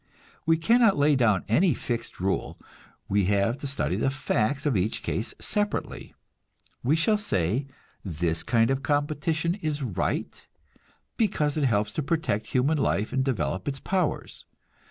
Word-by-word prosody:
We 165 0 +5
cannot 225 +3 +4
lay 145 +1 +4
down 110 -8 +2
any 160 - +3
fixed 115 -1 -4
rule; 95 +1 -1 0.5
we 100 -1 +2
have 100 +5 +1
to 140 - -4
study 140 - -1
the - - +1
facts 135 +1 -1
of 145 -5 +2
each 100 +3 -1
case 110 - -3
separately. 205 0 -3 0.7
We 135 +6 +3
shall 210 +6 +2
say, 120 - 0 0.4
this 80 -2 -1
kind 115 +1 +2
of 135 0 0
competition 155 +4 0
is 150 -2 -2
right, 105 -9 -2 0.7
because 155 -9 +1
it 150 -3 +1
helps 105 -3 +1
to 155 - -2
protect 145 -8 -1
human 140 +5 +1
life 110 -6 0
and 130 0 +2
to 135 - +1
develop 90 - -2
its 135 -1 -2
powers. 185 -1 -2
135 Hz, 155 wpm, -26 LUFS, 105-155 Hz, 0.7 s, We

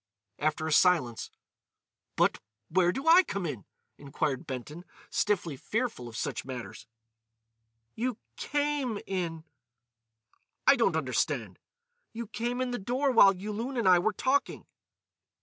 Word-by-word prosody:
After 155 +1 0
a 160 - -2
silence: 150 - +3 0.9
"But—where 115 - 0
do 270 - -5
I 340 +3 +9
come 200 - -4
in?" 130 - -5 0.3
inquired 140 -1 -3
Benton, 140 +6 -6 0.3
stiffly 175 -7 0
fearful 220 - -3
of 115 -2 -8
such - - -3
matters. 125 -3 -8 1.1
"You 245 0 -2 0.2
came 290 -6 -1
in." 170 -4 -3 1.2
"I - - +7
don't - - +2
understand." - - -1 0.5
"You 235 +1 -5
came 235 +4 -3
in 255 -1 -1
the 245 - -3
door 255 +7 0
while 200 -5 +7
Yulun 215 +7 -4
and 230 - +1
I 180 -1 +7
were 215 +5 +1
talking." 265 +7 0
190 Hz, 125 wpm, -29 LUFS, 150-245 Hz, 1.2 s, I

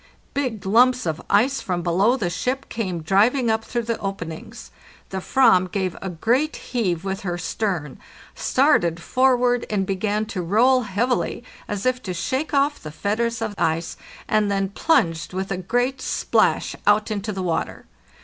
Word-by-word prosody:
Big 250 -8 -2
lumps 245 +4 +4
of 160 0 -2
ice 250 +7 +3
from 175 -2 -2
below 195 +9 +2
the 205 - -1
ship 255 +9 -2
came 185 -8 -3
driving 225 - +3
up 220 0 0
through 240 0 -3
the 230 0 -2
openings: 165 - -6 0.4
the 190 - -3
/ram 185 -5 +3
gave 190 -3 -1
a 190 - -4
great 240 - 0
heave 185 -9 -2
with 195 0 -3
her 175 -2 -3
stern, 175 -5 -3 0.3
started 170 -1 +2
forward 250 +3 +2
and 200 -3 0
began 205 +3 -1
to 210 -4 -4
roll 240 +9 +3
heavily, 235 +3 -1 0.2
as 205 +1 -4
if 255 0 +1
to 185 -5 -5
shake 260 - -2
off 285 0 +1
the 155 - -7
fetters 225 +8 -1
of 220 -2 -3
ice, 160 +1 0 0.3
and 215 -1 +2
then 195 -1 0
plunged 180 - +1
with 190 +1 -3
a 195 - -1
great 245 +8 -1
splash - - +1
out 210 +1 +3
into 210 0 -2
the 190 -2 -4
water. 170 -2 -2
205 Hz, 165 wpm, -23 LUFS, 180-245 Hz, 0.4 s, lumps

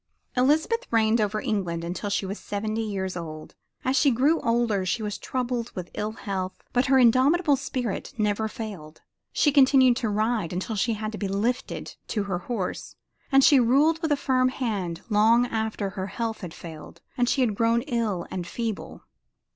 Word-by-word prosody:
Elizabeth 315 - +2
reigned 225 0 +3
over 210 0 0
England 175 -6 -2
until 175 +4 -4
she 200 0 0
was 195 +2 -5
seventy 215 +2 -3
years 195 -4 -3
old. 155 -3 -7 0.3
As 260 +1 +2
she 285 0 +4
grew 275 +7 +3
older 230 -4 +1
she 185 +5 -1
was 210 -1 -4
troubled 245 -2 -3
with 180 -2 -6
ill 215 +1 -3
health, 190 -4 -5
but 245 +1 +2
her 265 0 +5
indomitable 275 +6 +4
spirit 255 -5 -4
never 215 0 0
failed 205 -10 -8
her. - - -42 0.3
She 295 - +3
continued 265 -3 +5
to 230 -4 -1
ride 215 -4 0
until 185 +5 -3
she 230 +3 +1
had 215 0 -4
to 215 - -7
be 200 - -1
lifted 215 +6 -2
to 210 - -1
her 190 -3 -2
horse, 195 -1 -4 0.4
and 270 0 +6
she 280 -1 +7
ruled 285 +7 +3
with 320 -3 -1
a 290 - +3
firm 255 -2 +2
hand 205 -10 -3
long 225 +2 +4
after 220 -4 -2
her 190 -1 -4
health 225 +2 -4
had 175 -4 -7
failed 160 -2 -10 0.2
and 245 -1 +1
she 270 - +2
had 235 -4 +2
grown 230 +2 +2
ill 230 - -1
and 180 -2 -4
feeble. 220 -6 -5
220 Hz, 185 wpm, -26 LUFS, 195-255 Hz, 0.4 s, she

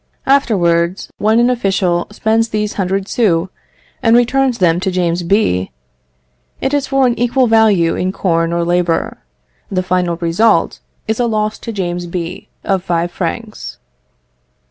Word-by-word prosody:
Afterwards, 180 -10 +1
when 220 +2 +3
an 240 +1 +3
official 195 -7 0
spends 220 +2 0
these 210 -1 -2
hundred 195 0 -2
sous, 185 -7 +1 0.5
and 230 0 +4
returns 250 +1 +2
them 175 -4 +2
to 190 +1 -1
James 175 -1 0
B., 170 - +1 0.9
it 265 - -2
is 285 -1 0
for 270 -1 +2
an 245 - +2
equal 245 +2 +2
value 215 -7 +3
in 185 +1 -1
corn 165 -3 0
or 170 0 0
labour. 175 -1 0 0.5
The 185 -1 -1
final 180 -1 0
result 170 +3 +1 0.3
is 220 +1 -1
a 240 - +2
loss 215 -1 -1
to 230 - -6
James 175 -4 -3
B. 170 -1 -6
of 190 -3 0
five 175 -1 -1
francs. 210 +6 -5
195 Hz, 145 wpm, -16 LUFS, 175-225 Hz, 0.9 s, and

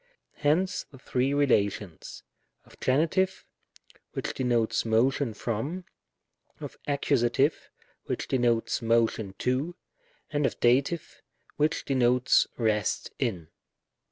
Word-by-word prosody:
Hence 165 +6 +1
the 135 - -14
three 130 +1 0
relations: 105 - 0 0.4
of - - -19
Gen., 140 +6 +2 1.1
which - - -3
de - - -3
notes 120 -3 +1
motion 115 +2 +1
from; 135 - -3 0.7
of - - -7
Accus., 140 0 +2 0.5
which - - -3
denotes 120 -3 +1
motion 115 -3 +1
to; 135 +8 -1 0.6
and 145 -2 +2
of - - -6
Dat., 125 +4 +4 0.7
which 155 +2 +1
denotes 125 -2 +3
rest 110 -3 0
in. 95 - -2
125 Hz, 100 wpm, -28 LUFS, 115-140 Hz, 1.1 s, Dat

